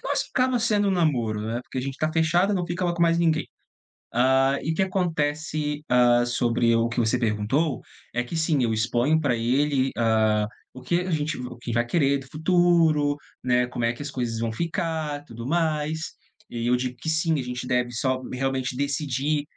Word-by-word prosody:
que - - -28
nós - - 0
acaba 255 -1 +2
sendo 210 -3 +2
um - - +2
namoro, 125 - +1
né, 115 +3 -3
porque 130 - -6
a - - 0
gente 135 +1 -5
tá 155 0 0
fechado, 175 +5 +2
não 180 -2 0
ficava 175 0 -1
com 170 - 0
mais 170 0 +3
ninguém. 160 -2 +1 0.7
Hã, 130 +3 +3
e 160 - -1
o - - 0
que 190 - +1
acontece, 155 -4 -1
hã, 120 -1 +4
sobre 120 -1 +1
o 115 0 +2
que 120 - -2
você 120 +2 +1
perguntou, 120 +6 0 0.3
é 120 - +1
que 125 - -7
sim, 160 -5 +1
eu 115 -1 +1
exponho 120 +7 +2
pra 135 -5 +1
ele, 135 +3 +1
hã, 110 -2 +2 0.3
o 130 - -10
que 170 +8 0
a 180 0 -3
gente 150 -1 -1
o 125 -1 -6
que 120 0 -6
vai 120 +1 +1
querer 140 -1 +2
do 135 - -12
futuro, 160 -3 +3 0.3
né, 125 -1 +2
como 120 -2 -3
é 115 - +1
que 135 - -10
as 145 - -5
coisas 115 -3 -3
vão 115 -1 -1
ficar, 160 - -3
tudo 115 -2 -9
mais. 160 -1 0 0.5
E 115 0 -4
eu 125 - +3
digo 125 0 -3
que 160 - -4
sim, 160 -1 +1
a - - -2
gente 125 0 -5
deve 125 -1 0
só 130 +2 -1
m 125 - -6
realmente 135 -1 -1
decidir, 140 +1 -1
135 Hz, 210 wpm, -25 LUFS, 120-160 Hz, 0.7 s, hã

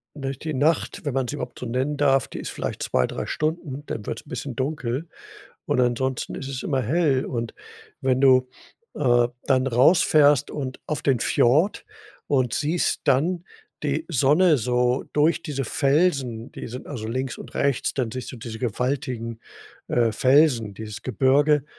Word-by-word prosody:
Durch 135 -2 -5
die 155 -1 -4
Nacht, 150 +6 0
wenn 145 -4 -2
man 135 -2 0
sie 145 - -3
überhaupt - - -7
so 125 - -5
nennen 130 +5 -1
darf, 135 -3 +3
die - - -7
ist - - -5
vielleicht - - -4
2, 65 - +1
3 - - -5
Stunden, 155 -3 -3
dann 105 - -5
wird's 115 - -4
'n - - -17
bisschen 125 0 -5
dunkel, 135 +2 -2 0.6
und - - +1
ansonsten 125 +1 0
ist 135 - -6
es 135 -1 -5
immer 135 -3 0
hell. 140 0 +1
Und 115 -2 -4 0.5
wenn 130 -1 +1
du, 130 -2 +5 0.5
äh, 120 -4 +3 0.2
dann 130 -1 +2
rausfährst 145 +2 +4
und 130 -3 -5
auf 155 - -3
den 130 -4 +2
Fjord 150 - +2 0.4
und 130 -4 +1
siehst 160 +4 0
dann 165 +6 +2 0.4
die 150 +2 -1
Sonne 155 +3 +4
so 125 +1 +1
durch 150 +3 +2
diese 140 -5 -3
Felsen 135 -4 +1
die - - -7
sind 125 +2 -8
also 120 -7 -5
links 130 +2 -3
und - - -11
rechts, 140 -3 0
dann 125 -4 -1
siehst 130 0 -6
du - - -8
diese 110 -1 -7
gewaltigen, 125 -1 -2 0.5
äh, 115 -2 +2
Felsen, 130 -3 +3
dieses 105 0 -8
Gebirge, 140 +4 +3
130 Hz, 170 wpm, -24 LUFS, 125-145 Hz, 0.6 s, du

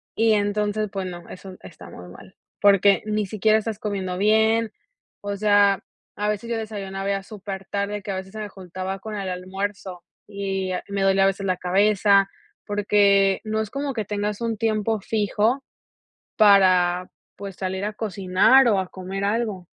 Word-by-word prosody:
Y 225 0 +3
entonces, 210 0 0
pues 195 -2 -4
no, 175 -1 -9
eso 185 0 -10
está - - -12
muy 90 - -11
mal, 185 - -14 0.3
porque 200 0 +5
ni 215 -1 -1
siquiera 215 +2 +2
estás 220 -1 -4
comiendo 190 -4 -3
bien, 220 +2 +2 0.5
o 205 0 -4
sea, 205 -1 +3 0.3
a 210 0 -1
veces 210 +2 -3
yo 230 - 0
desayunaba 200 -3 -5
ya 195 -1 -1
supertarde, 200 0 -5
que 200 - -6
a - - -3
veces 190 0 -7
se 220 - -8
me 210 -1 -5
juntaba 190 +1 -6
con 215 +1 -7
el 195 -2 -4
almuerzo, 185 0 -5 0.3
y 195 -2 -3
a 180 - -3
me 200 -1 -2
dolía 195 0 +3
a - - +5
veces 195 0 -1
la 185 -1 +1
cabeza, 200 +2 +3 0.4
porque 200 -1 +3
no 220 0 -1
es 220 -1 -4
como 275 0 -3
que 220 -3 -2
tengas 205 +1 -3
un 230 -1 -2
tiempo 220 -1 0
fijo, 220 +5 0 0.7
para, 185 -4 +4 0.3
pues, 195 -1 -8
salir 190 +1 -3
a 210 - -3
cocinar 210 +5 +3
o, 205 -4 +3
a 185 - -3
comer 190 +2 -6
algo. 205 -4 -2
200 Hz, 175 wpm, -23 LUFS, 190-215 Hz, 0.7 s, porque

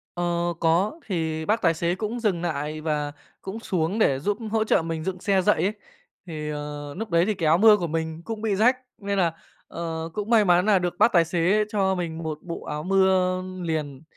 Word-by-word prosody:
Ờ, 175 0 -1
có. 180 - +1
Thì 160 -4 -2
bác 220 +2 +1
tài 165 -2 +3
xế 170 +2 -1
cũng 220 +4 -3
dừng 200 -7 0
nại 155 -2 -3
và 150 -2 -1 0.3
cũng 195 +4 -6
xuống 185 0 -1
để 135 -10 +3
giúp 205 +8 -1
hỗ 220 -1 +2
trợ 215 - +2
mình 165 -1 -4
dựng 185 0 -3
xe 195 0 +2
dậy 210 +3 +2
ấy. 200 +3 +1 0.5
Thì, 155 -3 -5
ờ, 145 -1 -6
núc 225 - -4
đấy 170 +1 +3
thì 215 - +1
cái 170 -5 -1
áo 160 +2 +5
mưa 215 +1 +7
của 175 -4 -2
mình 160 0 -3
cũng 225 -2 -5
bị 215 -3 0
rách, 240 +6 +4 0.2
nên 200 -1 -3
là, 170 -3 +2 0.3
ờ, 165 -1 -5
cũng 210 +1 -4
may 220 -3 +5
mắn 180 +1 +4
nà 205 -3 +4
được 175 -1 -3
bác 235 - +5
tài 170 -2 +5
xế 175 +5 +2
cho 190 -2 +1
mình 165 -3 -4
một 155 -1 -3
bộ 170 -1 -6
áo 150 0 -4
mưa 185 0 +2 0.2
liền, 155 -4 -3
175 Hz, 220 wpm, -25 LUFS, 160-200 Hz, 0.5 s, mưa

